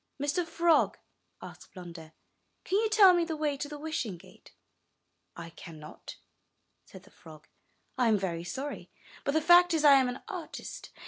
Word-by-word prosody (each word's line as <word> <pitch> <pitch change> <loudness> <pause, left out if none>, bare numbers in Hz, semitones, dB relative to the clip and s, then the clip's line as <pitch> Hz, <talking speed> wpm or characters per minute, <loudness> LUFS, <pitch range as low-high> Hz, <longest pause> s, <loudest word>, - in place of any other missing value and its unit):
'*Mr. 290 +6 -1
Frog," 335 0 +2 0.5
asked - - -13
Blunder, 170 -3 -11 0.5
''can - - -14
you 440 0 0
tell 410 -4 +7
me 350 -1 +2
the 330 -1 -4
way 300 -2 -1
to 290 +1 -6
the 295 - -7
Wishing 290 - -4
Gate?" 185 +2 -18 0.8
'*I 170 -1 -9
cannot," 155 -2 -11 0.7
said - - -14
the - - -20
frog. 155 -1 -16 0.5
'1 250 -2 +2
am 220 -2 +3
very 170 -4 -4
sorry, 265 +12 -6 0.3
but 280 - -1
the 315 - +3
fact 350 0 +6
is, 310 -1 0
I 280 -2 +8
am 260 -2 +2
an 250 - -7
artist. 370 -7 -8
280 Hz, 170 wpm, -29 LUFS, -, 0.8 s, I